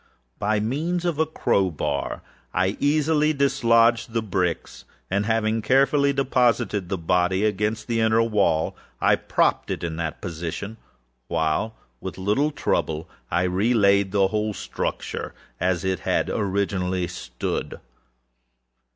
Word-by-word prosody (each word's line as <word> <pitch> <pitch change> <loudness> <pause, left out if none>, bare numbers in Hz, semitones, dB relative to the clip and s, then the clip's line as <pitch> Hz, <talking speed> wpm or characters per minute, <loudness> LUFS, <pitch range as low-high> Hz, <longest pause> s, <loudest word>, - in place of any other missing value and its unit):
By 110 0 +1
means 160 +11 -1
of 170 -4 -1
a 160 - +3
crow 100 -10 +1
bar 70 -3 -3 0.3
I 95 +3 +1
easily 150 +1 +2
dislodged 120 -5 +3
the 115 -1 0
bricks, 90 -4 -2 0.3
and, 100 +2 +1
having 110 0 +1
carefully 140 +4 +3
deposited 120 -8 +1
the 95 - -1
body 90 +4 +1
against 105 +1 -1
the 115 -1 -1
inner 110 0 +3
wall, 100 -8 +1 0.2
I - - +4
propped - - 0
it - - -3
in 80 -2 -3
that 80 -2 -3
position, 90 +6 -5 0.5
while, 85 +7 0 0.2
with 95 - -6
little 105 +11 +1
trouble, 80 - -1 0.2
I 85 +2 +1
re 95 +7 +1
laid 100 -2 +4
the 100 -1 +3
whole 105 -1 -1
structure - - -4 0.2
as 90 0 0
it 95 -1 -1
originally 95 -3 0
stood. - - -4
105 Hz, 130 wpm, -24 LUFS, 90-120 Hz, 0.5 s, I